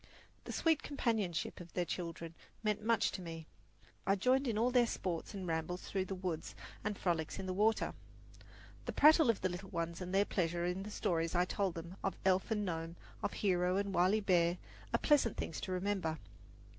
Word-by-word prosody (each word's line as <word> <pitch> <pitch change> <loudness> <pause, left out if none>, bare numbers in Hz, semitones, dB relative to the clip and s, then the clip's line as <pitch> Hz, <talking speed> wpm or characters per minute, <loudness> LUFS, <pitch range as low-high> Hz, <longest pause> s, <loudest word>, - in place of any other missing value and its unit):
The - - -5
sweet 320 -2 +2
companionship 220 - -1
of 175 -1 -11
their 180 - 0
children 170 -1 -4 0.3
meant 210 -1 0
much 230 +1 +3
to 190 - -5
me. 165 -2 -7 0.6
I 195 - +5
joined 255 +6 +2
in 225 -3 0
all 240 +3 +3
their 245 -2 +5
sports 180 -2 -3
and 190 -2 -4
rambles 165 +2 -2
through 190 -1 -1
the 195 - -4
woods 180 -4 -4 0.3
and 210 0 -2
frolics 165 -3 -1
in 195 - -4
the 185 - -2
water. 215 +4 +2 0.9
The - - -3
prattle 310 -2 +7
of 230 - +2
the 185 - +1
little 180 +2 -6
ones 170 +1 -3
and 180 0 -4
their 195 +1 +4
pleasure 175 -3 0
in 180 +2 -1
the 205 - -6
stories 170 -5 0
I 175 +1 +4
told 190 -1 -1
them 170 +3 -7
of 195 - -1
elf 190 +2 +3
and 210 -2 0
gnome, 165 -1 -3 0.3
of - - -1
hero 180 -2 +2
and 200 -1 -1
wily 185 +5 +4
bear, 175 -3 +3 0.3
are - - +3
pleasant 285 -7 +3
things 160 - -4
to - - -4
remember. 185 -3 -1
185 Hz, 195 wpm, -35 LUFS, 170-210 Hz, 0.9 s, prattle